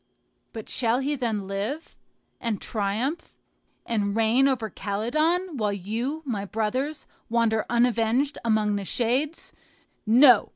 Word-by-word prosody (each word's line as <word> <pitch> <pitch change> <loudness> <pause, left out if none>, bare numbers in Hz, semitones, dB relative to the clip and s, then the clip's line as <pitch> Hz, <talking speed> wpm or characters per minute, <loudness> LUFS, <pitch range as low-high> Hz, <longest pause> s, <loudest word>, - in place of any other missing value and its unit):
But 220 -3 -8
shall 235 -1 +1
he 285 +2 -1
then 225 -7 -2
live, 205 +11 -4 0.4
and 230 -4 -2
triumph, 225 +9 -2 0.5
and 205 -3 -1
reign 225 +4 +4
over 250 -5 0
Calydon, 305 - -1
while 210 -3 0
you, 230 - -3
my 215 -7 -2
brothers, 240 +9 -2 0.2
wander 225 -2 +1
unavenged 240 +3 +2
among 215 -2 +2
the 200 - -4
shades? 255 - -1 0.5
No! 245 0 +7
230 Hz, 120 wpm, -26 LUFS, 215-270 Hz, 0.5 s, No